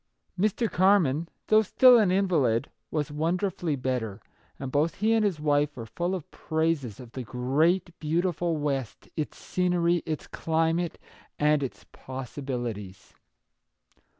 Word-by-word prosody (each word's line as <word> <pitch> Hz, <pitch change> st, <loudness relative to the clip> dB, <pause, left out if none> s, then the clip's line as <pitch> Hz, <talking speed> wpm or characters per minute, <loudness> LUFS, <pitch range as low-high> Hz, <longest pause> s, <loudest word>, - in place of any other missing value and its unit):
Mr. 215 Hz, +5 st, +1 dB
Carman, 170 Hz, -6 st, +3 dB, 0.2 s
though 215 Hz, 0 st, +5 dB
still 245 Hz, +3 st, +6 dB
an 210 Hz, -4 st, +3 dB
invalid, 160 Hz, -, +2 dB, 0.2 s
was 150 Hz, -2 st, -2 dB
wonderfully 170 Hz, +1 st, -1 dB
better, 125 Hz, -6 st, -2 dB, 0.4 s
and 135 Hz, -1 st, -5 dB
both 150 Hz, +3 st, +1 dB
he 220 Hz, +3 st, +2 dB
and 225 Hz, -1 st, +3 dB
his 195 Hz, -7 st, 0 dB
wife 145 Hz, -1 st, +1 dB
were 115 Hz, -, -5 dB
full 175 Hz, +10 st, -2 dB
of 175 Hz, -5 st, -8 dB
praises 160 Hz, -8 st, -1 dB
of 125 Hz, -3 st, -11 dB
the 130 Hz, -, -5 dB
great, 140 Hz, -, +1 dB
beautiful 170 Hz, +1 st, 0 dB
West, 140 Hz, -6 st, -3 dB
its 155 Hz, -, -3 dB
scenery, 175 Hz, -1 st, +1 dB
its 155 Hz, -2 st, -3 dB
climate, 165 Hz, +1 st, 0 dB, 0.4 s
and 150 Hz, 0 st, +3 dB
its 135 Hz, -, -5 dB
possi 130 Hz, +1 st, -7 dB
bilities. 110 Hz, -8 st, -5 dB
155 Hz, 135 wpm, -27 LUFS, 135-180 Hz, 0.4 s, still